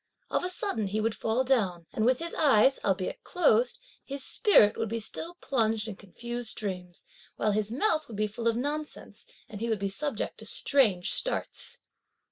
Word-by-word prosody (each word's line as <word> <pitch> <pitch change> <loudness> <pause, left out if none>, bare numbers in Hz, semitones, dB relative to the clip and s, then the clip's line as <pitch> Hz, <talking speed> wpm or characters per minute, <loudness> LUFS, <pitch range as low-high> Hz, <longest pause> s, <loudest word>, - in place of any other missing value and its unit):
Of - - +1
a 360 - 0
sudden, 365 - -1
he 205 +3 -1
would 220 +1 0
fall 225 +4 0
down, 195 -10 +1
and 220 +1 +1
with 255 0 +4
his 335 +3 -5
eyes, 270 -3 +4
albeit 190 -1 -1
closed, 255 -9 +2 0.3
his 275 -1 -3
spirit 225 - +5
would 225 - -2
be 230 +1 -2
still 330 +10 -5
plunged 225 -8 0
in 215 - -5
confused 235 +4 -6
dreams, 180 -4 -5 0.3
while 215 - +1
his 210 +1 0
mouth 310 - +1
would 220 - -8
be 215 - +2
full 215 +3 -4
of 230 0 +2
nonsense 300 - -5 0.2
and 210 -1 -9
he 230 - -1
would 220 - +1
be 195 0 -2
subject 250 +3 -3
to - - -9
strange 215 -11 +2
starts. - - -2
225 Hz, 185 wpm, -28 LUFS, 210-275 Hz, 0.3 s, spirit